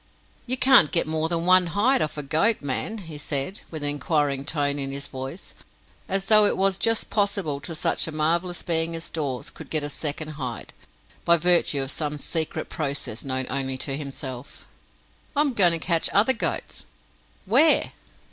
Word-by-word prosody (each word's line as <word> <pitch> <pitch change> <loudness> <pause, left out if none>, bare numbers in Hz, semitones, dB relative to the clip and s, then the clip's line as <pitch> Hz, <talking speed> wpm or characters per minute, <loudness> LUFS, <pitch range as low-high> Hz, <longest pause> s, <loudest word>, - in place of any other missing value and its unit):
"You 255 +2 0
can't 255 - +6
get 170 - +2
more 160 +1 -1
than 170 0 -1
one 185 0 +5
hide 255 +5 +3
off 150 - -2
a 150 - -3
goat, 160 +9 +1
man?" 160 +10 -2
he 155 -2 -9
said, 145 +6 -2
with 155 -3 -7
an 145 - +1
inquiring 145 -2 -1
tone 145 -1 -1
in 135 -1 -2
his 140 +1 -5
voice 135 +7 -8 0.6
as 195 0 0
though 215 0 +6
it - - -1
was 195 0 +1
just 225 -1 +2
possible 200 -8 0
that 165 +3 -7
such 155 - +1
a - - -5
marvellous 165 +3 0
being 165 0 0
as 165 - -5
Dawes 140 -6 -3
could - - -12
get 155 -2 -1
a 145 - -4
second 155 +1 -3
hide, 125 -3 -5 0.5
by 170 0 +5
virtue 170 -5 +3
of 135 - -4
some 150 -1 -3
secret 160 +2 -3
process 140 -7 -4
known 130 -1 -2
only 135 -1 -2
to 135 +1 -2
himself. 135 -2 -7 0.7
"I 290 - +3
am 290 -3 +1
going 180 -6 +4
to - - +1
catch 165 0 +1
other 220 +6 +5
goats." 230 - -4 0.6
"Where?" 275 +11 +4
160 Hz, 185 wpm, -24 LUFS, 140-185 Hz, 0.7 s, can't